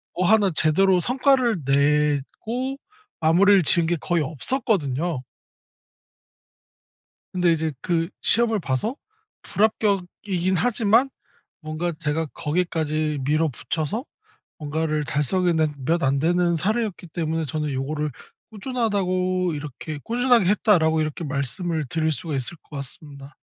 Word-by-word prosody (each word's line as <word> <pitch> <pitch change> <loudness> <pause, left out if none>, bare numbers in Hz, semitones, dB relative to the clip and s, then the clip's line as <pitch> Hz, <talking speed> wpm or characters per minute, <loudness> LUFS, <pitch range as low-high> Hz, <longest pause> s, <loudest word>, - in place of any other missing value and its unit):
뭐 180 0 +1
하나 210 -3 +4
제대로 180 +4 +3
성과를 250 - +2
내고 150 - 0 0.4
마무리를 185 +4 +5
지은 165 +2 +4
게 175 - +1
거의 175 -2 0
없었거든요. 155 - -1 2.1
근데 180 -2 +3
이제 160 -1 0
그 165 -1 0
시험을 225 -2 +3
봐서 175 - -2 0.5
불합격이긴 195 -3 0
하지만 230 +3 +3 0.5
뭔가 155 +2 -3
제가 160 0 -2
거기까지 155 -2 -1
밀어붙여서 155 - -1 0.5
뭔가를 155 -1 -1
달성해 165 +5 +1
낸 155 -2 +1
몇 170 +4 +1
안 135 +1 +2
되는 175 +2 +2
사례였기 210 +1 -1
때문에 160 -1 -2
저는 150 0 -3
요거를 150 +3 -2 0.4
꾸준하다고 185 -6 -1
이렇게 150 +1 -6
"꾸준하게 245 -2 +3
했다."라고 175 -5 +3
이렇게 155 +2 -3
말씀을 150 +3 -2
드릴 160 +3 0
수가 155 0 -4
있을 135 +6 -3
것 150 - -13
같습니다. 140 +1 -8
165 Hz, 285 characters per minute, -23 LUFS, 150-195 Hz, 2.1 s, 마무리를